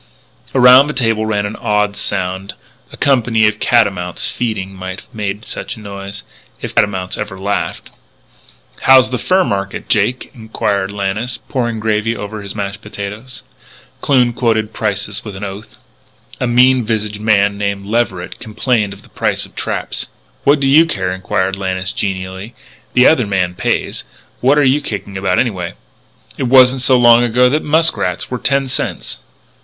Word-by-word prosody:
Around 130 +2 +7
the 150 - -3
table 115 -4 +1
ran 105 -1 0
an 105 - -5
odd 105 -1 0
sound 95 0 -3 0.4
a - - -11
company 115 -5 +3
of 105 0 -1
catamounts 95 -7 +1
feeding 105 -5 -3
might 95 0 -7
have - - -25
made 105 0 -4
such - - -5
a - - -12
noise 100 -1 -8 0.4
if - - -6
catamounts 95 -3 0
ever 105 -2 -5
laugh. 100 +2 -2 1.0
"How's 130 -1 +6
the 125 - -1
fur 185 +1 +2
market, 100 - -3
Jake?" 110 +5 0
inquired 100 -4 -2
Lannis, 105 +4 -2
pouring 120 -4 -3
gravy 110 +1 0
over 105 +1 -6
his 100 0 -7
mashed 100 -1 -4
potato. 105 +2 -7 0.8
Kloon 125 -4 +3
quoted 110 -3 0
prices 100 0 -2
with 105 -3 -8
an 95 - -7
oath. 100 +2 -7 0.6
A 125 - 0
mean 125 +1 +4
visaged 105 -1 -2
young 105 - -9
man 100 -2 +3
named 100 -1 -2
Leverett 105 -5 -2
complained 110 -2 -1
of 100 - -15
the - - -19
price - - -1
of - - -19
traps. - - -3 0.4
"What 145 +1 +5
do 140 - 0
you 150 +5 +6
care?" 95 - -2
inquired 95 0 -1
Lannis 95 -1 -2
genially. 95 +3 -4 0.4
"The 125 0 +5
other 125 -8 +4
man 90 -3 0
pays. - - -2 0.4
What 135 +4 +3
are 145 - +4
you 140 +2 +3
kicking 100 -6 -5
about, 95 0 0
anyway? 95 -8 -1 0.6
It 130 - 0
wasn't 130 0 +6
so 130 0 +4
long 120 -1 +6
ago 120 +1 +3
that 150 +2 +1
muskrats 150 - +1
were 125 - -2
ten 135 +1 +1
cents." 125 - -3
105 Hz, 165 wpm, -16 LUFS, 100-125 Hz, 1.0 s, Around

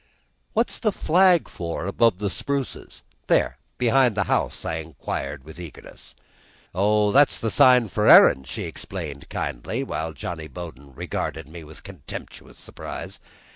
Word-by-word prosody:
"What's 230 +2 0
the 215 - +1
flag 180 -1 +3
for, 85 -1 -5
up 95 - -2
above 115 -1 +3
the 100 -1 -2
spruces 140 +3 -4 0.2
there - - +2 0.2
behind 125 -1 +3
the 105 - +3
house?" - - -1
I 80 - -2
inquired, 70 -3 -5
with 80 +4 -12
eagerness. 85 -5 -11 0.6
"Oh, 105 +2 +2
that's 140 +4 +5
the 115 - -2
sign 125 -3 +6
for - - 0
herrin'," 65 - +8
she - - -5
explained 70 -1 -7
kindly, 110 - -3
while 80 -10 -4
Johnny 80 +2 -6
Bowden 70 -4 -10
regarded 80 +3 -4
me 80 +1 -10
with 75 +1 -13
contemptuous 95 -8 -10
surprise. - - -8
90 Hz, 145 wpm, -24 LUFS, 80-125 Hz, 0.6 s, herrin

